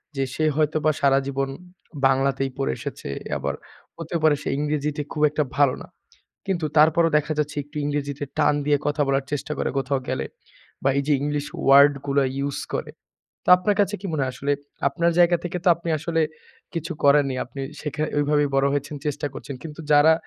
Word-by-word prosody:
যে 135 Hz, -, 0 dB
সে 155 Hz, -, 0 dB
হয়তোবা 155 Hz, 0 st, +2 dB
সারাজীবন 135 Hz, 0 st, +1 dB, 0.6 s
বাংলাতেই 135 Hz, 0 st, +1 dB
পড়ে 135 Hz, -, 0 dB
এসেছে। -, -, -6 dB, 0.3 s
আবার 70 Hz, +1 st, -3 dB, 0.4 s
হতে 165 Hz, 0 st, -6 dB
পারে 155 Hz, -2 st, +5 dB
সে -, -, -2 dB
ইংরেজিতে 150 Hz, 0 st, -1 dB
খুব 150 Hz, -, -3 dB
একটা 150 Hz, +1 st, 0 dB
ভালো 140 Hz, -3 st, +4 dB
না। -, -, -10 dB, 0.6 s
কিন্তু 175 Hz, -5 st, -1 dB
তারপরও 160 Hz, +2 st, +5 dB
দেখা 150 Hz, +1 st, -1 dB
যাচ্ছে 150 Hz, 0 st, -1 dB
একটু 145 Hz, +2 st, -24 dB
ইংরেজিতে 145 Hz, -1 st, -2 dB
টান 150 Hz, -1 st, +3 dB
দিয়ে 145 Hz, -1 st, +3 dB
কথা 145 Hz, +1 st, 0 dB
বলার 135 Hz, 0 st, +1 dB
চেষ্টা 145 Hz, +1 st, -3 dB
করে -, -, 0 dB
কোথাও 135 Hz, 0 st, -1 dB
গেলে। -, -, -2 dB, 0.6 s
বা 135 Hz, -, +3 dB
এই 140 Hz, -, +1 dB
যে 150 Hz, -, +4 dB
ইংলিশ 145 Hz, 0 st, -1 dB, 0.2 s
ওয়ার্ড 140 Hz, +1 st, +7 dB
গুলো 140 Hz, 0 st, +2 dB, 0.2 s
ইউস 140 Hz, 0 st, -2 dB
করে। -, -, -3 dB, 0.5 s
তো -, -, 0 dB
আপনার 200 Hz, +3 st, +1 dB
কাছে 205 Hz, +1 st, 0 dB
কি -, -, -7 dB
মনে 150 Hz, -, 0 dB
হয় 130 Hz, -, -2 dB
আসলে 140 Hz, +2 st, -1 dB, 0.4 s
আপনার 170 Hz, +4 st, +1 dB
জায়গা 175 Hz, 0 st, +5 dB
থেকে 175 Hz, -, -3 dB
তো -, -, +6 dB
আপনি 170 Hz, 0 st, -6 dB
আসলে 165 Hz, +1 st, 0 dB, 0.5 s
কিছু 165 Hz, -1 st, -4 dB
করেননি। 140 Hz, -2 st, +4 dB
আপনি 135 Hz, +2 st, -8 dB, 0.2 s
সেখ 150 Hz, -1 st, -5 dB, 0.2 s
ঐভাবেই 145 Hz, 0 st, +2 dB
বড় 135 Hz, 0 st, +3 dB
হয়েছেন, 145 Hz, +1 st, -2 dB
চেষ্টা 145 Hz, 0 st, -2 dB
করছেন। 140 Hz, -, -7 dB
কিন্তু 155 Hz, 0 st, -9 dB
যারা 150 Hz, +2 st, +7 dB
145 Hz, 185 wpm, -24 LUFS, 140-155 Hz, 0.6 s, ওয়ার্ড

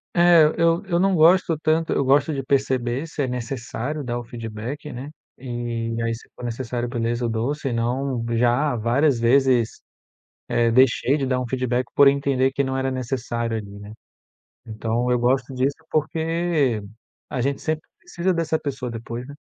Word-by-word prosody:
é, 175 Hz, -2 st, +7 dB
eu 170 Hz, +3 st, +2 dB
eu 175 Hz, -2 st, 0 dB
não 195 Hz, 0 st, +3 dB
gosto 165 Hz, 0 st, +4 dB
tanto. 160 Hz, +1 st, +1 dB
Eu 140 Hz, -, +1 dB
gosto 145 Hz, +4 st, +3 dB
de 135 Hz, -2 st, -3 dB
perceber 130 Hz, 0 st, 0 dB
se 150 Hz, -, -4 dB
é -, -, -1 dB
necessário 125 Hz, +3 st, -4 dB
dar 120 Hz, -1 st, -3 dB
o 120 Hz, -, -7 dB
feedback, 115 Hz, +6 st, -6 dB
né, 130 Hz, +4 st, -7 dB, 0.3 s
e 120 Hz, -2 st, -4 dB
aí, 115 Hz, 0 st, 0 dB
se 115 Hz, -, -10 dB
for -, -, -11 dB
necessário, 120 Hz, 0 st, -3 dB
beleza, 120 Hz, 0 st, -1 dB
eu 115 Hz, -, 0 dB
dou, 115 Hz, +6 st, -1 dB
senão 125 Hz, -1 st, -2 dB
já 125 Hz, +4 st, +2 dB
várias 120 Hz, +4 st, +2 dB
vezes, 125 Hz, -1 st, +3 dB, 0.7 s
eh, 115 Hz, -1 st, +2 dB
deixei 130 Hz, +2 st, +4 dB
de 135 Hz, -3 st, -1 dB
dar 130 Hz, -1 st, +1 dB
um 125 Hz, -, -3 dB
feedback 125 Hz, -1 st, 0 dB
por 140 Hz, -1 st, +7 dB
entender 140 Hz, -1 st, +2 dB
que 140 Hz, +1 st, 0 dB
não 130 Hz, 0 st, -2 dB
era 135 Hz, 0 st, 0 dB
necessário 120 Hz, -3 st, -2 dB
ali, 100 Hz, -2 st, -7 dB
né. 105 Hz, +1 st, -10 dB, 0.7 s
Então 115 Hz, +2 st, -2 dB
eu 125 Hz, -, +3 dB
gosto 130 Hz, +2 st, +1 dB
disso 135 Hz, +3 st, +1 dB, 0.2 s
porque 160 Hz, -5 st, 0 dB, 0.5 s
a 125 Hz, -, -2 dB
gente 140 Hz, +2 st, -1 dB
sempre 155 Hz, 0 st, -1 dB, 0.2 s
precisa 180 Hz, +2 st, -1 dB
dessa 165 Hz, -2 st, 0 dB
pessoa 135 Hz, -4 st, -4 dB
depois, 115 Hz, +1 st, -6 dB
né. 145 Hz, 0 st, -11 dB
130 Hz, 170 wpm, -23 LUFS, 120-145 Hz, 0.7 s, é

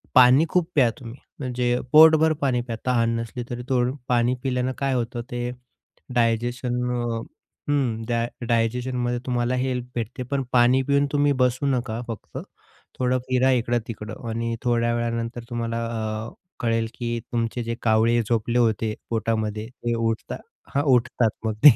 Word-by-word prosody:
पाणी 130 Hz, +4 st, +7 dB
खूप 180 Hz, -2 st, +1 dB
प्या 130 Hz, -5 st, +5 dB
तुम्ही 120 Hz, -1 st, -9 dB, 0.2 s
म्हणजे 125 Hz, -2 st, 0 dB
पोटभर 160 Hz, 0 st, +7 dB
पाणी 130 Hz, -4 st, +2 dB
प्या. 120 Hz, -1 st, -5 dB
तहान 115 Hz, -2 st, +2 dB
नसली 115 Hz, +1 st, -5 dB
तरी, 120 Hz, 0 st, -4 dB
थोडं 125 Hz, 0 st, +1 dB
पाणी 120 Hz, 0 st, +2 dB
पिल्यानं 130 Hz, -1 st, 0 dB
काय 135 Hz, -1 st, 0 dB
होतं 120 Hz, -1 st, -2 dB
ते 120 Hz, 0 st, -2 dB, 0.7 s
डायजेशन 120 Hz, +1 st, +1 dB, 0.2 s
अ, 120 Hz, -2 st, -1 dB, 0.5 s
हं, 125 Hz, -6 st, 0 dB
डाय 115 Hz, -1 st, 0 dB, 0.2 s
डायजेशनमध्ये 120 Hz, +1 st, 0 dB
तुम्हाला 125 Hz, 0 st, 0 dB
हेल्प 125 Hz, -1 st, -1 dB
भेटते. 120 Hz, +2 st, -3 dB
पण 135 Hz, +2 st, -2 dB
पाणी 125 Hz, +2 st, +5 dB
पिऊन 140 Hz, 0 st, +3 dB
तुम्ही 145 Hz, 0 st, +3 dB
बसू 125 Hz, +3 st, +1 dB
नका 120 Hz, -4 st, -1 dB
फक्त, 115 Hz, -2 st, -7 dB, 0.6 s
थोडं 125 Hz, 0 st, +2 dB
फिरा 130 Hz, +1 st, +3 dB
इकडं-तिकडं 115 Hz, -2 st, -2 dB
आणि 115 Hz, +1 st, -2 dB
थोड्या 120 Hz, -1 st, +2 dB
वेळानंतर 115 Hz, 0 st, -2 dB
तुम्हाला 115 Hz, -1 st, -2 dB
अ, 110 Hz, -1 st, -3 dB, 0.3 s
कळेल 115 Hz, -1 st, +1 dB
की 120 Hz, -1 st, -2 dB
तुमचे 120 Hz, 0 st, -1 dB
जे 115 Hz, 0 st, -3 dB
कावळे 115 Hz, +1 st, +3 dB
झोपले 115 Hz, +1 st, +1 dB
होते 110 Hz, -1 st, +1 dB, 0.2 s
पोटामध्ये, 110 Hz, -1 st, -1 dB
ते 120 Hz, -1 st, -3 dB
उठता 115 Hz, -1 st, -3 dB, 0.4 s
हां 140 Hz, -, +2 dB
उठतात 120 Hz, -1 st, +2 dB, 0.2 s
मग 110 Hz, -, 0 dB
ते. 145 Hz, -6 st, +10 dB
120 Hz, 150 wpm, -24 LUFS, 115-125 Hz, 0.7 s, ते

